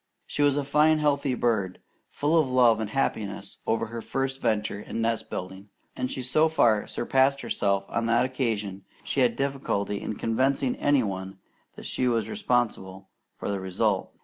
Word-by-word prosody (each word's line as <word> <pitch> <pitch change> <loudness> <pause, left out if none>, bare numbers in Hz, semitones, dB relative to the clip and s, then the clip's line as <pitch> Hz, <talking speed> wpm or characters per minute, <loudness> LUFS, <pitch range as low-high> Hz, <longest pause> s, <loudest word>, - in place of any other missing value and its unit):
She - - -3
was 145 -1 +4
a 145 - 0
fine 150 +3 +4
healthy 140 -3 +1
bird, 110 -7 0 0.3
full 150 +3 0
of 155 -5 +3
love 120 -3 +4
and 110 -2 -3
happiness 100 -6 -2
over 115 0 +1
her 115 +1 -6
first 135 +2 -3
venture 105 -1 0
in 115 - -5
nest 115 0 -1
building, 95 +2 -6 0.3
and 125 0 -3
she 130 - -4
so 155 +6 +3
far 115 -9 +3
surpassed 135 +3 +1
herself 100 -1 0
on 115 0 -1
that 120 +2 +3
occasion 110 -7 -2 0.2
she - - -2
had 120 -3 +3
difficulty 135 -7 -2
in 110 - -4
convincing 130 +4 0
any 145 -3 +3
one 95 -1 -5 0.4
that - - -10
she 130 - 0
was 115 -2 0
responsible 115 - -1 0.3
for - - -5
the 100 - -2
result. 95 -1 -1
120 Hz, 175 wpm, -26 LUFS, 105-135 Hz, 0.4 s, was